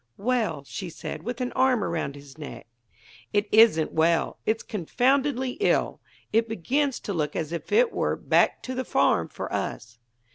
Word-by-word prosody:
"Well?" 215 - 0
she 180 +5 -6
said, 170 - -7
with 245 +2 -5
an 250 - -1
arm 255 -4 +2
around 160 -6 -2
his 140 -1 -13
neck. 145 -6 -9 0.7
"It 205 0 +2
isn't 215 -8 +5
well; 165 +1 +2
it's 225 +1 +1
confoundedly 255 - 0
ill. 415 - +1 0.3
It 225 +1 +2
begins 260 - 0
to 200 - -4
look 150 -4 -2
as 160 -1 -3
if 170 - -5
it 460 +2 +4
were - - 0
'back - - +2
to 255 - -4
the 260 0 -2
farm' 85 - +2
for - - -6
us." 115 +1 -4
215 Hz, 170 wpm, -26 LUFS, 160-255 Hz, 0.7 s, isn't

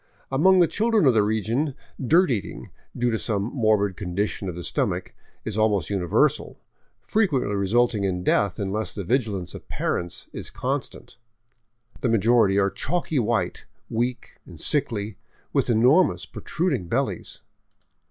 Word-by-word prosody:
Among 185 +8 +5
the 175 -2 +5
children 220 -2 +2
of 130 - +5
the 110 - +4
region 110 +7 0 0.3
dirt 165 +5 +4
eating, 105 -6 -4 0.3
due 120 0 +1
to 110 - -1
some 105 -4 -1
morbid 110 -6 +2
condition 100 +1 -3
of 85 - -6
the 90 - -6
stomach, - - -2 0.3
is 110 -1 -2
almost 105 -6 +1
universal, 90 -4 +1 0.5
frequently 145 - +1
resulting 105 +2 +1
in 90 -2 -1
death 100 0 +2
unless 105 +1 -2
the 100 - -4
vigilance 105 -4 -1
of - - -11
parents 85 0 -2
is - - -5
constant. 135 -2 -4 0.8
The 125 - 0
majority 115 -2 +3
are 100 -1 +2
chalky 165 -4 -1
white, 115 -1 -1 0.2
weak 120 +2 -3
and 85 -4 -12
sickly, 110 - 0 0.4
with - - +1
enormous, 125 +10 +4
protruding 170 - -2
bellies. - - -2
110 Hz, 140 wpm, -24 LUFS, 100-130 Hz, 0.8 s, Among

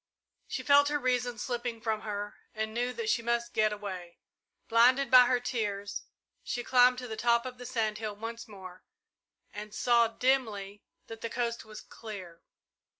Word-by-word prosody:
She - - -4
felt 285 0 +6
her 295 0 +1
reason 250 -3 0
slipping 240 0 -3
from 220 -1 -1
her 205 -1 -4 0.2
and 220 0 -3
knew 245 +2 0
that 455 - -5
she 250 - +2
must 235 0 -1
get 215 0 +3
away. 185 -4 -6 0.5
Blinded 250 +3 +4
by 250 -1 +9
her 250 0 +2
tears, 205 -5 -3 0.4
she 245 - -3
climbed 250 0 +5
to 250 0 -6
the 220 - -5
top 235 +2 +2
of 250 -1 -7
the 245 - -7
sand 215 -3 -1
hill 215 -2 -4
once 230 +3 -7
more, 185 -3 -11 0.7
and 210 0 -8
saw, 235 -1 +4
dimly, 220 -5 0 0.2
that 225 0 -10
the 230 - -3
coast 235 -1 -2
was 215 0 -10
clear. 190 -7 -10
230 Hz, 170 wpm, -30 LUFS, 210-245 Hz, 0.7 s, by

